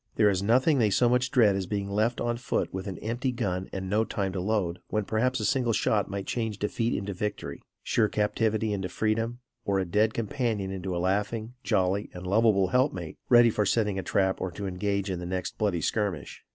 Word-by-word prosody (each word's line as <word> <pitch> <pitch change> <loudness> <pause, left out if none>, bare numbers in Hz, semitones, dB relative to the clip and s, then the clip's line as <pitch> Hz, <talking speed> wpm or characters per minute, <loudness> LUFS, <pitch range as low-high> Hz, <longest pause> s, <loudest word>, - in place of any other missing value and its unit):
There 105 -2 +4
is 95 -1 0
nothing 130 +8 +3
they 110 -3 +4
so 120 +5 +3
much 125 +2 +2
dread 115 -6 +4
as 95 -2 -2
being 100 0 -2
left 110 +4 0
on 120 0 -1
foot 120 - -2
with 95 +1 -4
an 95 -3 -5
empty 120 +4 -1
gun 95 -6 -2
and 95 0 -4
no 105 +3 +2
time 100 -4 -2
to 95 - -2
load, 95 -4 0
when 105 -1 -1
perhaps 125 +5 0
a 110 - -1
single 125 -3 +1
shot 105 -1 +1
might 100 0 -4
change 110 -4 -2
defeat 115 +3 -1
into 100 0 -4
victory; 105 +3 -4 0.2
sure 110 - +2
captivity 110 +1 0
into 95 -2 -3
freedom, 115 +5 -1 0.2
or 100 -1 0
a 95 - 0
dead 105 +5 +1
companion 115 -4 -1
into 95 -1 -4
a - - -1
laughing, 105 +5 -1
jolly 95 +2 +1
and 90 +1 -7
lovable 100 -1 +3
help 130 +6 +3
mate, 85 -4 -7
ready 120 -1 +7
for 105 - +1
setting 105 -1 +1
a - - -1
trap 95 0 0
or 95 - -1
to 100 +4 -6
engage 100 +1 -1
in 90 - -3
the 90 - -6
next 90 0 -4
bloody 100 -6 +1
skirmish. 100 -7 -2
105 Hz, 220 wpm, -28 LUFS, 95-115 Hz, 0.2 s, ready